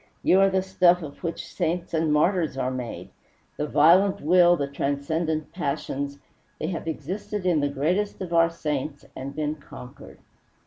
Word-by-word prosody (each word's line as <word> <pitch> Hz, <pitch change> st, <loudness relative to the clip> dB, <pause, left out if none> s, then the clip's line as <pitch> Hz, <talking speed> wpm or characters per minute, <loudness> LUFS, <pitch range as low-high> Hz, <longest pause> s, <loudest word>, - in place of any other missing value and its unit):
You 185 Hz, -, +5 dB
are 195 Hz, 0 st, +5 dB
the 190 Hz, -1 st, +1 dB
stuff 180 Hz, -2 st, +3 dB
of 145 Hz, -2 st, -9 dB
which 170 Hz, -1 st, -3 dB
saints 175 Hz, 0 st, -3 dB
and 160 Hz, -1 st, +1 dB
martyrs 160 Hz, -1 st, +2 dB
are 130 Hz, -1 st, -1 dB
made. 125 Hz, -2 st, -6 dB, 0.5 s
The 150 Hz, -, -2 dB
violent 180 Hz, +7 st, +5 dB
will, 175 Hz, +2 st, +5 dB
the 140 Hz, -, -1 dB
transcendent 150 Hz, +3 st, -2 dB
passions 140 Hz, -3 st, -3 dB, 0.4 s
they 155 Hz, -, -2 dB
have 170 Hz, -2 st, -5 dB
existed 185 Hz, +6 st, -4 dB
in 175 Hz, -4 st, +3 dB
the 145 Hz, 0 st, +1 dB
greatest 175 Hz, +9 st, -1 dB
of 180 Hz, -2 st, -5 dB
our 165 Hz, 0 st, +5 dB
saints, 150 Hz, -3 st, -4 dB
and 135 Hz, +1 st, -6 dB
been 150 Hz, -1 st, -1 dB
conquered." 125 Hz, -3 st, -12 dB
160 Hz, 165 wpm, -25 LUFS, 145-180 Hz, 0.5 s, You